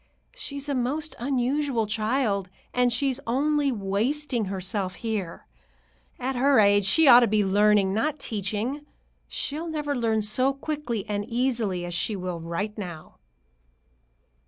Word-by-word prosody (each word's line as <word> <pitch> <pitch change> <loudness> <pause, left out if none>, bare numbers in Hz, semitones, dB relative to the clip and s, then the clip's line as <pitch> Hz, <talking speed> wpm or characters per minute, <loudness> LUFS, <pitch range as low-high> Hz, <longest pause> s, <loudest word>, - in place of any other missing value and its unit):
She's 280 - -5
a 285 - -1
most 280 +5 -2
unusual 260 -1 0
child, 215 -2 0 0.2
and 250 0 +3
she's 265 +2 0
only 285 +3 +1
wasting 235 +5 -1
herself 190 0 -3
here. 210 -7 -4 0.7
At 260 +2 -2
her 270 +1 +4
age 205 -1 +4
she 315 +10 +4
ought 245 -2 +10
to 240 - +3
be 210 -1 +2
learning, 205 0 +3
not 295 +8 0
teaching. 220 +4 -3 0.4
She'll 310 +4 -4
never 300 -3 -2
learn 225 -3 +1
so 255 +6 +1
quickly 275 -7 -3
and 205 -1 -2
easily 230 -7 0
as 175 - -5
she 205 +5 0
will 180 -2 -4
right 170 +6 -4
now." 175 -5 -8
230 Hz, 135 wpm, -26 LUFS, 205-275 Hz, 0.7 s, ought